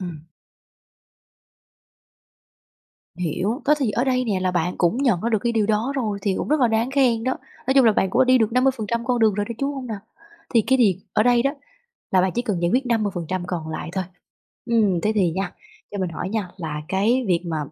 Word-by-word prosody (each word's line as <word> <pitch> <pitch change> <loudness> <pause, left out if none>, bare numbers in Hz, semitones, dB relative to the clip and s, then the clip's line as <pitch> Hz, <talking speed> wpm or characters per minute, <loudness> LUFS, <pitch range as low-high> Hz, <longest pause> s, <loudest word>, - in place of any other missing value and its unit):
Ừm. 165 -4 -7 2.9
Hiểu, 180 - -2
đó 300 - +5
thì 250 -7 0
ở 240 +5 0
đây 255 -1 +1
nè 200 -5 -1
là 185 0 +1
bạn 175 0 -1
cũng 175 +5 +2
nhận 245 -10 +2
ra 235 - -1
được 220 -2 +2
cái 235 +3 -1
điều 220 -3 +1
đó 220 +5 0
rồi 215 -6 -1
thì 195 -2 +1
cũng - - -3
rất 305 -1 +2
là 245 - +4
đáng 225 +3 0
khen 250 -5 +2
đó. 260 - 0 0.3
Nói 265 - +2
chung 270 -3 +6
là 220 - +6
bạn 190 -2 +1
cũng 255 - +3
đi 255 0 +5
được 220 -1 +1
50% 235 -3 +1
con 250 -1 +1
đường 220 -3 +3
rồi 205 0 -1
đó, 235 - -4
chứ 275 - 0
hông 275 -3 -4
nào? 220 -4 -4 0.6
Thì 230 - +7
cái 265 0 +3
việc 200 -7 +4 0.2
ở 215 - +3
đây 240 0 +4
đó 275 - +2 0.6
là 185 - +4
bạn 185 0 +1
chỉ 240 - +1
cần 205 -8 -2
giải 170 - +1
quyết 260 +1 +2
50% 185 -6 -1
còn 165 -3 -4
lại 160 - -5
thôi. 190 0 -2 0.6
Ừm, 210 -7 +2
thế 215 - +1
thì 180 -5 +2
nha, 190 +3 -3 0.4
cho 205 - -5
mình 185 -2 -1
hỏi 175 +3 -5
nha, 210 -4 -2
là 155 -3 -4
cái 225 +7 +1
việc 175 -2 +2
mà 160 -2 -2
215 Hz, 225 wpm, -22 LUFS, 185-245 Hz, 2.9 s, Thì